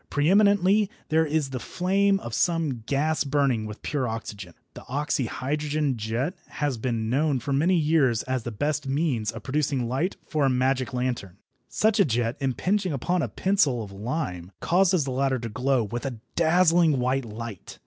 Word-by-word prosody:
Pre 145 Hz, +4 st, +2 dB
eminently 200 Hz, 0 st, +4 dB, 0.2 s
there 160 Hz, 0 st, +3 dB
is 150 Hz, -2 st, -1 dB
the 130 Hz, -, -3 dB
flame 195 Hz, +6 st, +1 dB
of 120 Hz, -, -7 dB
some 160 Hz, -4 st, 0 dB
gas 150 Hz, +3 st, +1 dB
burning 135 Hz, -6 st, +1 dB
with 105 Hz, 0 st, -9 dB
pure 140 Hz, -4 st, -1 dB
oxygen. 105 Hz, -5 st, -6 dB, 0.2 s
The -, -, -10 dB
oxyhydrogen 145 Hz, +1 st, -1 dB
jet 115 Hz, -, -2 dB
has 145 Hz, -5 st, -2 dB
been 115 Hz, -2 st, -2 dB
known 140 Hz, +4 st, +1 dB
for 140 Hz, +4 st, -3 dB
many 165 Hz, +7 st, +3 dB
years 150 Hz, -8 st, +2 dB
as 130 Hz, -1 st, -2 dB
the 120 Hz, -, -5 dB
best 145 Hz, +6 st, -2 dB
means 135 Hz, -6 st, 0 dB
of -, -, -6 dB
producing 140 Hz, 0 st, 0 dB
the -, -, -1 dB
light 135 Hz, +11 st, -1 dB
for 155 Hz, -2 st, -1 dB
a -, -, +3 dB
magic 130 Hz, +1 st, +1 dB
lantern. 125 Hz, -7 st, -3 dB, 0.3 s
Such 220 Hz, 0 st, +2 dB
a 200 Hz, -, +6 dB
jet 120 Hz, -3 st, 0 dB
impinging 180 Hz, -, 0 dB
upon 175 Hz, +7 st, 0 dB
a -, -, 0 dB
pencil 155 Hz, -, +1 dB
of 100 Hz, -, -10 dB
lime 100 Hz, -, -4 dB
causes 180 Hz, -2 st, +3 dB
the 135 Hz, -, -4 dB
latter 135 Hz, 0 st, +1 dB
to 115 Hz, -1 st, -5 dB
glow 125 Hz, +3 st, +1 dB
with 120 Hz, +3 st, -5 dB
a 125 Hz, -3 st, -5 dB, 0.2 s
dazzling 170 Hz, -2 st, +4 dB
white 130 Hz, +2 st, 0 dB
light. 110 Hz, -2 st, -8 dB
135 Hz, 180 wpm, -26 LUFS, 120-160 Hz, 0.3 s, a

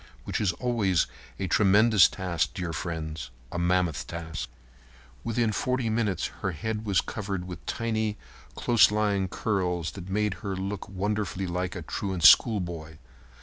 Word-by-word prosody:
Which -, -, -2 dB
is 100 Hz, -4 st, +2 dB
always 100 Hz, -5 st, +1 dB, 0.3 s
a 95 Hz, -, -2 dB
tremendous 105 Hz, +3 st, +5 dB
task, 85 Hz, -5 st, -2 dB
dear 90 Hz, -3 st, -3 dB
friends—a 80 Hz, -5 st, -5 dB
mammoth 90 Hz, -2 st, +1 dB
task. 80 Hz, -1 st, -5 dB, 0.7 s
Within 115 Hz, -1 st, +1 dB
forty 125 Hz, 0 st, 0 dB
minutes 105 Hz, -7 st, 0 dB, 0.2 s
her 95 Hz, -, -1 dB
head 110 Hz, +7 st, -3 dB
was 100 Hz, -3 st, +3 dB
covered 95 Hz, -4 st, -4 dB
with 90 Hz, -2 st, -8 dB
tiny, 110 Hz, -2 st, -1 dB, 0.4 s
close 120 Hz, -2 st, +5 dB
lying 105 Hz, -2 st, +1 dB
curls 90 Hz, -4 st, -1 dB
that 95 Hz, -2 st, -9 dB
made 105 Hz, +1 st, +1 dB
her 100 Hz, -3 st, -3 dB
look 95 Hz, +1 st, -4 dB
wonderfully 100 Hz, 0 st, -2 dB
like 90 Hz, 0 st, -2 dB
a 90 Hz, -, -5 dB
truant 95 Hz, +1 st, -3 dB
schoolboy. 85 Hz, -6 st, +5 dB
95 Hz, 140 wpm, -27 LUFS, 85-105 Hz, 0.7 s, tremendous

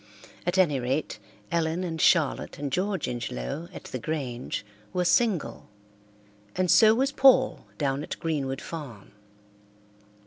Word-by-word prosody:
At 175 Hz, -, +1 dB
any 150 Hz, -8 st, +3 dB
rate, 130 Hz, +5 st, -2 dB, 0.3 s
Ellen 170 Hz, +1 st, 0 dB
and 165 Hz, -3 st, -3 dB
Charlotte 160 Hz, -6 st, +2 dB
and 140 Hz, -1 st, -4 dB
George 190 Hz, +2 st, -1 dB
Ingelow 120 Hz, -, -4 dB
at -, -, -10 dB
the 130 Hz, -, -6 dB
Grange 125 Hz, -6 st, -4 dB, 0.3 s
were 180 Hz, -1 st, 0 dB
single, 180 Hz, -, +1 dB, 0.9 s
and 185 Hz, -1 st, +2 dB
so 220 Hz, 0 st, +7 dB
was 270 Hz, +3 st, +1 dB
Paul 265 Hz, -1 st, +4 dB
down 140 Hz, -1 st, 0 dB
at -, -, -6 dB
Greenwood 140 Hz, -5 st, -2 dB
Farm. 135 Hz, -, -8 dB
160 Hz, 130 wpm, -27 LUFS, 135-185 Hz, 0.9 s, so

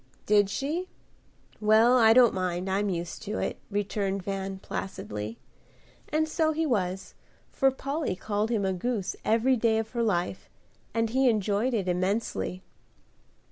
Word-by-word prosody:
"Did 205 Hz, -1 st, +4 dB
she? 315 Hz, -, -2 dB, 0.7 s
Well, 220 Hz, +3 st, +5 dB
I 225 Hz, -3 st, +6 dB
don't 245 Hz, -1 st, +6 dB
mind, 185 Hz, 0 st, -2 dB
I'm 200 Hz, +2 st, 0 dB
used 170 Hz, -2 st, -4 dB
to 215 Hz, 0 st, -4 dB
it," -, -, -2 dB
returned 200 Hz, -1 st, -2 dB
Van, 195 Hz, 0 st, -3 dB
placidly; 105 Hz, -, -5 dB, 0.7 s
and 315 Hz, +1 st, +1 dB
so 315 Hz, 0 st, +1 dB
he 320 Hz, +1 st, 0 dB
was, 190 Hz, -8 st, -1 dB, 0.4 s
for 270 Hz, -, +3 dB
Polly 275 Hz, -, -3 dB
called 210 Hz, +2 st, -2 dB
him 215 Hz, -4 st, 0 dB
a 190 Hz, -, +1 dB
goose 200 Hz, +1 st, -2 dB
every 230 Hz, +4 st, +3 dB
day 225 Hz, -1 st, +2 dB
of 225 Hz, 0 st, -3 dB
her 235 Hz, -, -1 dB
life, 190 Hz, -4 st, -1 dB, 0.4 s
and 225 Hz, -1 st, 0 dB
he 260 Hz, +1 st, +4 dB
enjoyed 215 Hz, +3 st, +1 dB
it 195 Hz, -4 st, -1 dB
immensely. 185 Hz, 0 st, -1 dB
210 Hz, 145 wpm, -28 LUFS, 190-240 Hz, 0.7 s, I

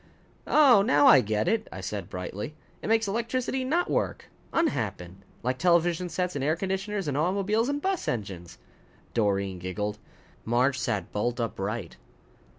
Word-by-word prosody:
"Oh, 270 Hz, -9 st, +6 dB
now 145 Hz, -8 st, +4 dB
I 135 Hz, -, +8 dB
get 110 Hz, -1 st, -1 dB
it," 225 Hz, 0 st, +1 dB
I -, -, -7 dB
said 95 Hz, 0 st, -5 dB
brightly. 100 Hz, +10 st, -5 dB, 0.3 s
"It -, -, -5 dB
makes 225 Hz, -1 st, +3 dB
electricity 240 Hz, +5 st, -1 dB
not 330 Hz, +7 st, +1 dB
work -, -, -2 dB, 0.2 s
unhappen. 105 Hz, -, -1 dB, 0.3 s
Like 125 Hz, +1 st, -1 dB
television 175 Hz, 0 st, +2 dB
sets 180 Hz, +2 st, -2 dB
and 140 Hz, -, -2 dB
air 155 Hz, +3 st, +2 dB
conditioners 195 Hz, +1 st, -2 dB
and 140 Hz, -, -1 dB
automobiles 200 Hz, -, +1 dB
and 285 Hz, 0 st, -1 dB
bus 385 Hz, -1 st, -1 dB
engines." 95 Hz, -7 st, -4 dB, 0.6 s
Doreen 100 Hz, -4 st, 0 dB
giggled. 105 Hz, +4 st, -3 dB, 0.4 s
Marge 125 Hz, +3 st, +2 dB
sat 105 Hz, -, -2 dB
bolt 120 Hz, +4 st, -1 dB
upright. 105 Hz, -3 st, -3 dB
140 Hz, 150 wpm, -27 LUFS, -, 0.6 s, I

